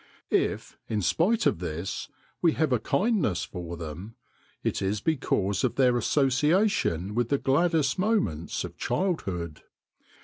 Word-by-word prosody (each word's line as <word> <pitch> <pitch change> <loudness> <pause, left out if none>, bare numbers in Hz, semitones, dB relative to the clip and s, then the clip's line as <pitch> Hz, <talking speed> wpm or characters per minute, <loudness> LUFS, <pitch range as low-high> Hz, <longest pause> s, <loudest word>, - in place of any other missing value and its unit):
If, - - 0
in 105 -3 -1
spite 215 - +2
of - - +2
this, 85 +1 -4 0.3
we 165 -3 +4
have 155 -5 +1
a; 125 - +2
kindness 140 - +1
for 85 -2 -7
them, 85 +7 -7 0.5
it - - -1
is 100 +2 0
because 100 - 0
of 130 - +1
their 125 -2 +4
association 135 - +2
with 120 +1 0
the 140 - +3
gladdest 150 +3 +2
moments 185 - 0
of - - -8
childhood. 95 - -2
125 Hz, 135 wpm, -27 LUFS, -, 0.5 s, we